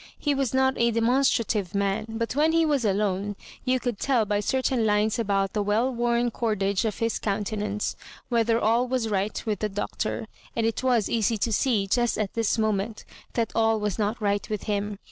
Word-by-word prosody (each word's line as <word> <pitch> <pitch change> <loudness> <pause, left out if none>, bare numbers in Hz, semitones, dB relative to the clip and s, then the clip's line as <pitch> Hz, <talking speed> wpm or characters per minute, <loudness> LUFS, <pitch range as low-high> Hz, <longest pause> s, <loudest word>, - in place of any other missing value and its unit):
He 290 - 0
was 275 -3 0
not 265 0 +3
a 235 0 +4
demonstrative 230 -4 +1
man, 200 +2 0
but 230 +2 -3
when 310 +3 +3
he 330 0 +4
was 290 -5 +1
alone 200 -1 0 0.3
you 255 0 +1
could 240 -4 -3
teU 250 -5 +2
by 205 0 0
certain 260 +2 0
lines 215 +1 +2
about 195 -3 0
the 210 - 0
weU 220 +6 +1
wom 240 0 +1
cordage 205 -3 0
of 215 - -2
his 230 0 -1
countenance 210 0 -2 0.3
whether 230 -1 +2
all 235 +3 +2
was 245 -3 -1
right 205 0 -1
with 210 -4 -1
the 215 - -1
Doctor; 205 +1 -3 0.3
and 230 - +1
it 225 - 0
was 245 -5 +2
easy 225 -1 +1
to 225 +2 -1
see 220 -5 +2
just 240 +4 +1
at 210 -3 -2
this 230 0 +1
moment 215 0 -1 0.3
that 230 -2 0
all 225 -1 +2
was 210 -1 -2
not 215 +3 0
right 205 -1 -1
with 210 -2 -3
him. 205 -1 -2
220 Hz, 195 wpm, -26 LUFS, 205-240 Hz, 0.3 s, a